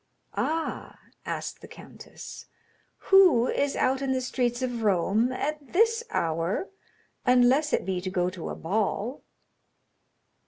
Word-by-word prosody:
"Ah," 325 +1 -3 0.3
asked - - -4
the - - -11
countess, - - -11 0.6
"who 365 -12 +7
is 280 +1 0
out 265 +1 +1
in 270 -1 0
the 260 - 0
streets 250 -1 -1
of 245 -2 -2
Rome 210 +4 +2
at 290 +1 -4
this 455 +4 +3
hour, 165 - -1 0.5
unless 255 +4 +4
it - - 0
be 185 -2 -2
to 185 - -3
go 180 -1 0
to 180 -3 -7
a - - -4
ball?" 210 - -2
250 Hz, 130 wpm, -27 LUFS, 195-285 Hz, 0.6 s, who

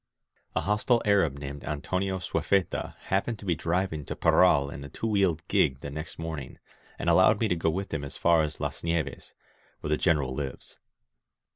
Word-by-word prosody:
A - - +2
hostile 105 +4 +2
Arab 95 -9 +3
named 70 0 -7
Antonio 95 +6 -2
Swayfeta 95 +1 0 0.2
happened 100 +4 +1
to 105 - -11
be 90 - +2
driving 85 0 -1
to - - -5
Parral 70 0 +4
in 70 - -8
a 70 - -8
two 110 - -6
wheeled 95 -7 +1
gig 65 0 +2
the 70 - -6
next 75 +3 -6
morning, 80 -5 -6 0.4
and - - -4
allowed - - +5
me - - +2
to 90 - +1
go 80 -1 +1
with 95 +3 -3
him 70 -3 -2
as 70 - -6
far 85 -1 +4
as 75 -1 -3
Las - - -4
Nieves, 80 -5 -2 0.5
where 75 - -4
the - - -7
Grenerrl 75 -7 +2
lives. 65 -1 -6
80 Hz, 185 wpm, -28 LUFS, 70-95 Hz, 0.5 s, allowed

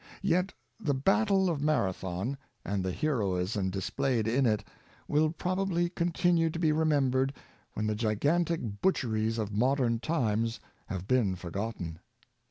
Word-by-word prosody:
Yet 185 0 +2 0.3
the 145 -10 0
Battle 195 +6 +3
of 160 -5 -1
Mara 145 -11 +2
thon, 95 +9 -3 0.3
and 100 -2 -1
the 95 - -1
heroism 100 -7 0
displayed 110 +4 -1
in 125 +3 +3
it, 105 -2 +1 0.4
will 155 +1 +3
probably 180 +1 0
continue 170 -1 +2
to 160 - -5
be 165 -2 +2
remembered 140 -4 +2 0.4
when 105 - -2
the 110 - +1
gigantic 115 +2 0
butcher 130 -12 +1
ies 110 +1 0
of 105 -2 -2
modern 120 +1 +2
times 115 -4 0 0.3
have 95 0 -5
been 115 -7 +2
forgotten. 90 -2 -5
130 Hz, 140 wpm, -30 LUFS, 105-165 Hz, 0.4 s, Battle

